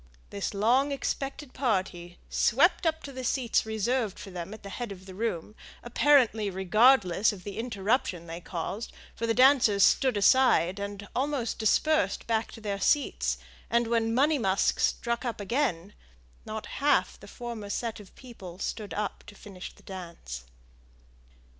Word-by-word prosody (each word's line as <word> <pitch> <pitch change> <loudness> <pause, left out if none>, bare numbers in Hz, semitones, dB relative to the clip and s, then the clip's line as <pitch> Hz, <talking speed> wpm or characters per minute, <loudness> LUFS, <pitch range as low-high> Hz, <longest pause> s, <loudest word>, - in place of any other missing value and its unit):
This 200 0 -3
long 250 +8 +3
expected 275 0 -4
party 185 -8 -2
swept 330 - +3
up 320 0 -1
to 280 - -7
the 260 -1 -7
seats 240 -3 +1
reserved 220 0 -1
for 195 - -9
them 180 +1 -6
at 215 - -10
the 200 - -7
head 235 +1 -5
of 190 -1 -10
the 190 - -10
room, 210 -2 -3 0.3
apparently 240 -4 +3
regardless 195 +1 +4
of 195 -3 -10
the 205 +1 -6
interruption 205 -5 -1
they 165 +1 -7
caused; 190 +6 -5 0.2
for 230 - -3
the 225 - +1
dancers 250 -6 +5
stood 260 -5 +4
aside, 200 -4 +4
and 200 0 -6
almost 265 -3 -1
dispersed 310 +8 +2
back 225 -1 -1
to - - -10
their 200 -2 -3
seats, 290 +7 +1 0.3
and 235 0 +2
when 225 -1 +1
"Money 285 +5 +3
musk" 195 -3 +1
struck 235 +1 0
up 240 -3 -3
again, 205 - -1 0.5
not 220 0 -5 0.2
half 290 - +2
the - - -13
former 235 -4 -7
set 230 +1 -3
of 200 -3 -15
people 200 -9 -11
stood 205 +1 -4
up 210 -1 -3
to 205 - -12
finish 190 -3 -9
the - - -21
dance. 170 - -8
220 Hz, 160 wpm, -28 LUFS, 195-255 Hz, 0.5 s, dancers